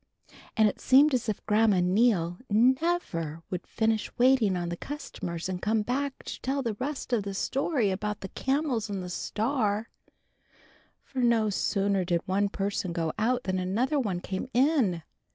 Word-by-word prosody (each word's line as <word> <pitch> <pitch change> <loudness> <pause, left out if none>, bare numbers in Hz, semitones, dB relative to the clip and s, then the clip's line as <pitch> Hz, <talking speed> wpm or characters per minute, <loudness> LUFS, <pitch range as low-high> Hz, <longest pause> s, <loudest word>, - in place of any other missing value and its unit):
And 220 -1 +6
it 205 - -3
seemed 280 +3 +5
as 245 -3 0
if 210 - -4
Grandma 215 -2 +3
Neal 180 -2 +2
never 225 - +1
would 180 - -4
finish 220 -1 0
waiting 240 -7 +4
on 175 -1 -3
the 175 - -3
customers 180 - -6
and 185 -1 -4
come 215 0 +1
back 270 +4 -2
to - - -7
tell 270 +1 -1
the 230 -3 -1
rest 270 -1 -4
of 230 - +3
the 200 -1 -5
story 260 - 0
about 210 +2 -3
the 190 - -6
Camels 265 - -1
and 195 -2 -3
the 180 - -6
Star; 220 +1 -1 1.1
for 265 - -6
no 230 -3 +3
sooner 195 -1 +1
did 175 -1 0
one 200 +2 +1
person 195 -3 -2
go 165 -2 -1
out 245 +3 +1
than 185 0 -1
another 230 +11 0
one 195 -8 -2
came 190 +8 -4
in. 250 - +2
215 Hz, 170 wpm, -28 LUFS, 185-255 Hz, 1.1 s, And